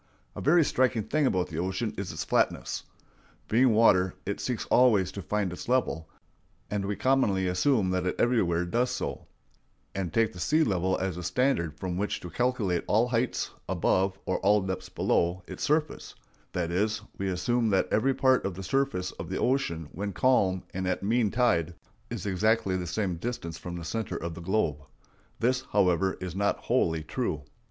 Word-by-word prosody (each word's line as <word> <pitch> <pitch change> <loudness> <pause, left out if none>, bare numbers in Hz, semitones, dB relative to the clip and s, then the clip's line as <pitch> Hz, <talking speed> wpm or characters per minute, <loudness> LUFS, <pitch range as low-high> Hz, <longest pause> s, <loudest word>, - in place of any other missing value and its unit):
A - - -5
very 165 +3 +5
striking 125 -5 +1
thing 145 +6 +1
about 90 -4 0
the 80 - -4
ocean 95 +5 -2
is 100 -1 -4
its - - -4
flatness. - - 0 0.6
Being 125 +3 +4
water, 95 -5 +4
it 100 - -3
seeks 125 -3 -2
always 105 -8 +4
to 100 - -6
find 100 0 -1
its 90 - -8
level; 125 -11 0 0.6
and 100 -1 -1
we 100 +1 -1
commonly 115 -8 +2
assume 95 +2 +2
that 90 0 0
it 90 - -1
everywhere 90 -8 +2
does 120 +8 +1
so, 125 - -4 0.7
and 95 -4 -3
take 115 +4 +2
the 90 - -10
sea 155 - +3
level 95 - +1
as 95 -2 -2
the 90 - -5
standard 85 - 0
from 90 -1 -3
which 105 +2 -1
to 90 - -8
calculate 120 -8 0
all 115 +4 +3
heights 120 0 -1 0.2
above 95 0 +1
or 95 - 0 0.3
depths 95 -1 -4
below 85 +2 0
its - - -8
surface; 150 0 -1 0.4
that 85 -2 -1
is, 105 +4 0 0.2
we 95 - -1
assume 110 +6 +1
that 95 -2 +2
every 130 +5 +2
part 130 -1 +3
of 100 -3 -3
the 95 - -7
surface 115 -5 0
of - - -6
the - - -2
ocean 105 - 0
when 100 +1 -4
calm 95 -3 +2
and 95 0 -2
at 90 - -1
mean 110 +1 +2
tide 85 -9 +1 0.3
is - - -5
exactly 100 0 +1
the 90 -1 -3
same 90 0 -1
distance 85 -6 -5
from 90 -1 -6
the 85 -1 -6
center 110 +4 -3
of 85 0 -4
the 85 - -8
globe. 85 -5 0 0.6
This, 125 +2 +2
however, 95 -1 +2
is 90 -2 -5
not 100 +1 +1
wholly 80 -1 0
true. - - -3
95 Hz, 180 wpm, -28 LUFS, 90-120 Hz, 0.7 s, very